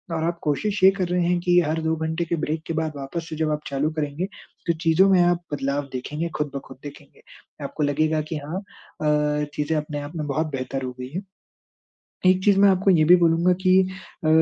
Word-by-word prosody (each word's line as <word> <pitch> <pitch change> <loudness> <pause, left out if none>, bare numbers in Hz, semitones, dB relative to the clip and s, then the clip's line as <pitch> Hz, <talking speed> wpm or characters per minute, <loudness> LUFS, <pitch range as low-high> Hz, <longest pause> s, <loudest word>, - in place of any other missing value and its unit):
और 160 - -1
आप 170 0 -1
कोशिश 190 +7 -1
ये 190 - +10
कर 185 - 0
रहे 180 -1 +1
हैं 175 0 +2
कि 175 0 +4
हर 160 +1 -1
2 160 0 +1
घंटे 160 +2 -2
के 170 +1 -1
ब्रेक 155 +1 -1
के 165 - -2
बाद 160 -1 -2
वापस 160 +5 -5
से 155 - -5
जब 155 -1 0
आप 150 0 -2
चालू 140 +2 0
करेंगे, 150 +2 -2 0.4
तो 170 - +3
चीज़ों 170 +4 +4
में 180 -2 +5
आप 175 0 +2
बदलाव 140 0 -2
देखेंगे, 150 +6 -3
खुद-ब-खुद 140 -3 -5
देखेंगे। 145 0 -12 0.4
आपको 150 - -3
लगेगा 155 +2 +1
कि 160 - -1
हाँ, 150 +5 -5
अ, 150 -5 -2
चीज़ें 150 +2 -1
अपने 150 -1 -3
आप 145 +4 -8
में 150 -2 -3
बहुत 155 +3 0
बेहतर 135 0 -4
हो 125 - -3
गयी 125 0 -6
हैं। 190 - -3 1.0
एक 185 0 +4
चीज़ 200 -1 +5
मैं 200 - +7
आपको 190 +1 +2
ये 165 -4 +4
भी 180 - +10
बोलूँगा 170 +1 +3
कि 185 0 +5 0.5
अ, - - +3
160 Hz, 215 wpm, -23 LUFS, 150-175 Hz, 1.0 s, ये